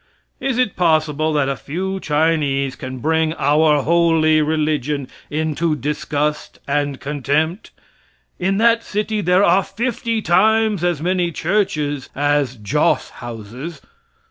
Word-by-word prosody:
Is 270 -3 -1
it 250 -6 +1
possible 155 -2 +1
that 145 -3 +1
a 140 - -1
few 190 +8 -4
Chinese 145 -4 0
can 130 +1 -7
bring 160 +4 +1
"our 150 0 +3
holy 165 -2 +3
religion" 150 -3 -1 0.2
into 155 +1 -1
disgust 150 +1 -2
and 145 -1 -1
contempt? 150 - -1 0.7
In 190 +2 0
that 230 +1 +3
city 210 +1 -2
there 180 +1 +3
are 190 +1 +4
fifty 230 +1 -2
times 215 +1 +3
as 175 -4 0
many 180 -1 0
churches 155 -7 -1
as 145 -2 +1
joss 105 -4 0
houses. 120 +7 -7
155 Hz, 120 wpm, -19 LUFS, 145-180 Hz, 0.7 s, are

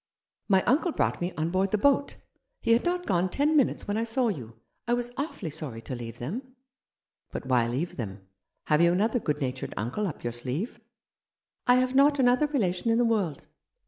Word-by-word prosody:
My 190 -2 +4
uncle 320 +7 +2
brought - - 0
me 175 +1 -1
on 160 +2 -1
board 190 +2 +1
the 215 - +1
boat. 280 +5 +2 0.5
He 230 - +4
had 235 - +3
not 355 0 -1
gone 185 0 +1
ten 295 - +1
minutes 280 -5 +2
when 205 +1 -1
I 225 - +1
saw 235 +1 +1
you. 120 - -6 0.3
I 240 - +3
was 245 0 -3
awfully 270 - -4
sorry 140 -6 -5
to - - -6
leave 120 -1 -6
them." 160 - -4 0.5
" - - -56
But - - -5
why 125 -3 +2
leave 135 +9 -3
them? 95 -5 -6 0.4
Have 150 +1 +3
you 170 0 +5
another 220 +6 +2
good 150 -7 -2
natured 130 -1 -3
uncle 125 - -1
up 160 - -7
your 120 - -2
sleeve? 135 - -4 0.3
" - - -65
" - - -43
I 245 - +7
have 255 0 +2
not 285 +2 +5
another 255 +3 +4
relation 225 -7 0
in 225 - +3
the 240 - +3
world." 205 -10 0
195 Hz, 210 wpm, -28 LUFS, -, 0.5 s, I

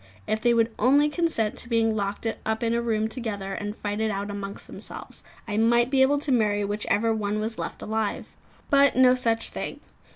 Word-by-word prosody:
If 215 +1 -1
they 240 0 +3
would 230 0 +2
only 285 +6 +4
consent 295 -10 0
to 235 - -7
be 230 -1 +2
locked 205 -1 -2 0.2
up 220 +1 -2
in 230 0 +1
a 235 - +1
room 220 -2 0
together 210 -5 -4
and 205 0 -5
fight 205 +1 -3
it 220 - +1
out 200 0 -3
amongst 200 0 -6
themselves, - - -10 0.2
I 210 -1 -2
might 235 +2 +3
be 270 -1 +3
able 275 +2 +4
to 295 - -2
marry 210 -4 +2
whichever 210 +2 0
one 210 -1 -1
was 220 +1 -4
left - - -5
alive. 220 -1 -2 0.5
But 280 -1 +5
no 255 -1 +6
such 230 -3 0
thing. - - -5
220 Hz, 200 wpm, -25 LUFS, 210-240 Hz, 0.5 s, no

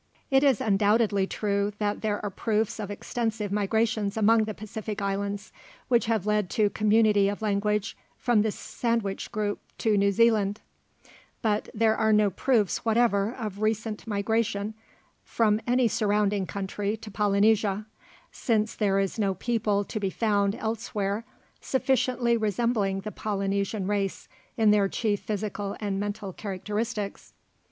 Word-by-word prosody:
It 270 +1 +5
is 270 -6 +4
undoubtedly 205 -1 +2
true 200 0 -1
that 210 -1 -1
there 210 -1 -1
are 205 - -2
proofs 220 +2 -1
of 205 -2 -4
extensive 215 0 -3
migrations 210 0 0
among 220 +1 +4
the 215 -1 -5
Pacific 215 0 -6
islands, 200 +1 -3 0.4
which 240 -2 +3
have 220 -4 0
led 210 -3 +1
to 210 -2 +3
community 215 -2 +3
of 205 +2 -5
language 210 0 0 0.2
from 240 -4 +2
the 220 - +1
sandwich 230 -3 -2
group 205 -1 -2 0.2
to 220 -2 +2
New 200 0 +3
Zealand; 210 -1 +3 0.8
but 215 -2 0
there 220 0 +3
are 220 -1 +2
no 210 -1 +4
proofs 220 -1 +1
whatever 225 -2 +2
of 210 -4 -5
recent 215 0 -1
migration 210 0 -1 0.5
from 215 -1 +1
any 245 0 +3
surrounding 205 -2 +1
country 200 +2 -3
to 220 -1 -10
Polynesia, 205 0 +2 0.5
since 220 -3 0
there 195 -2 +1
is 195 +3 -1
no 195 -3 +1
people 210 -1 0
to 215 - -5
be 195 -2 -1
found 200 -1 +1
elsewhere 220 -1 -2 0.4
sufficiently 255 -2 +1
resembling 215 -2 0
the 215 +2 -6
Polynesian 200 -1 -2
race 200 -1 -2 0.3
in 220 -2 +5
their 205 -1 +4
chief 210 -2 0
physical 205 -1 -4
and 200 -2 -2
mental 205 -1 -4
characteristics. 210 +2 -4
210 Hz, 140 wpm, -27 LUFS, 200-225 Hz, 0.8 s, It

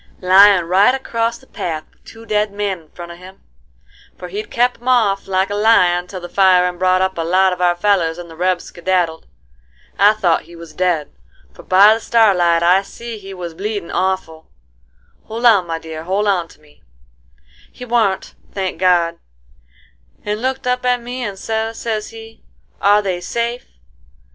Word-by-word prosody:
— - - -31
"Lyin' 190 0 +6
right 195 +8 +3
acrost 230 -2 -3
the - - -19
path 160 -10 -5
with - - -35
two 225 0 -14
dead 210 -1 0
men 200 -2 -3
in 160 -2 -23
front 170 -1 -10
of 170 - -12
him; 185 +1 -14 0.8
for 180 - -9
he'd 205 +4 -6
kep 245 +1 0
'em 245 - -12
off 215 -6 +2
like 190 +1 0
a - - -2
lion 180 -5 +3
till 185 0 -7
the 175 - -7
firin' 180 -1 +3
brought 185 0 +2
up 190 -2 -2
a - - +1
lot 185 +3 +2
of 180 - -7
our 175 -1 +3
fellers 175 -3 +1
and 175 -1 -9
the 165 - -13
rebs 180 +1 0
skedaddled. 175 -2 -2 0.7
I 205 +2 +6
thought 185 -6 0
he 170 - -13
was 165 -2 -12
dead, 175 -3 -1 0.4
for - - -13
by 200 +3 +6
the 225 - -3
starlight 180 -8 +3
I 180 +3 +4
see 230 +2 -9
he 195 -1 -10
was 175 -2 -7
bleedin' 200 +1 -5
awful,—hold 160 - -6
on, 200 -7 +5
my 165 -1 -3
dear, 160 0 -8
hold 200 +3 0
on 180 -4 +1
to - - -20
me,—he 65 - -19
warn't, 225 -5 0 0.2
thank 190 -4 -4
God, 175 -2 +2 1.1
and 210 +1 -3
looked 260 +1 -2
up 250 0 -1
at 250 0 +1
me 245 +2 -7
and 200 -4 -5
sez, 225 +2 -3
sez 215 -2 -3
he, 225 0 -13 0.4
'Are 205 +1 +4
they 185 -3 -3
safe? 235 +4 -3
190 Hz, 180 wpm, -18 LUFS, 175-215 Hz, 1.1 s, Lyin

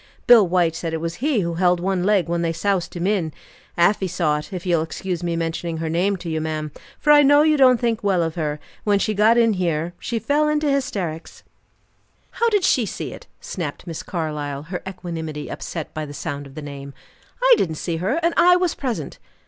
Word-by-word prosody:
Bill 230 -5 +7
White 170 -2 +2
said 165 -1 -3
it - - -3
was 165 +1 -4
he 275 -6 +2
who 170 -1 -2
held 180 +1 +2
one 185 0 -1
leg 200 -2 +2
when 170 0 -1
they 165 -1 0
soused 190 0 -1
him 175 0 -2
in. 190 -6 0 0.5
Afy 190 +3 +3
saw 160 -4 0
it 150 - -10
if 185 -2 -6
you'll 170 -3 +2
excuse 175 +2 -4
me 170 -1 -1
mentioning 165 0 -3
her 160 0 -3
name 185 +5 +1
to 175 - -9
you, 160 -1 -2
ma'am, 155 -1 -3 0.3
for 295 +1 +4
I 295 - +8
know 290 +1 +6
you 310 0 +4
don't 255 -4 +5
think 235 -2 -1
well 190 -4 +2
of 165 -1 -2
her 155 -3 -2
and 150 - -10 0.2
when 205 -1 +3
she 215 +2 0
got 215 +3 +4
in 230 -2 +4
here, 170 -2 -1
she 235 - -3
fell 290 +7 +1
into 300 -1 +1
hysterics." 195 - -3 0.9
"How 465 0 +1
did 415 -4 +1
she 250 - +3
see - - -5
it?" - - -12
snapped 165 -6 -5
Miss 165 -3 -5
Carlyle, 150 -4 -4
her 175 +3 -5
equanimity 165 -5 -6
upset 160 -3 -6
by 155 -1 -4
the 145 - -9
sound 145 -1 -5
of 135 - -16
the 155 - -7
name. 140 -1 -8 0.4
"I - - +6
didn't 160 -3 0
see 165 +1 -3
her, 205 - 0
and 335 0 +2
I 355 +1 +6
was 360 -2 +1
present." 255 -5 -4
175 Hz, 220 wpm, -22 LUFS, 160-225 Hz, 0.9 s, I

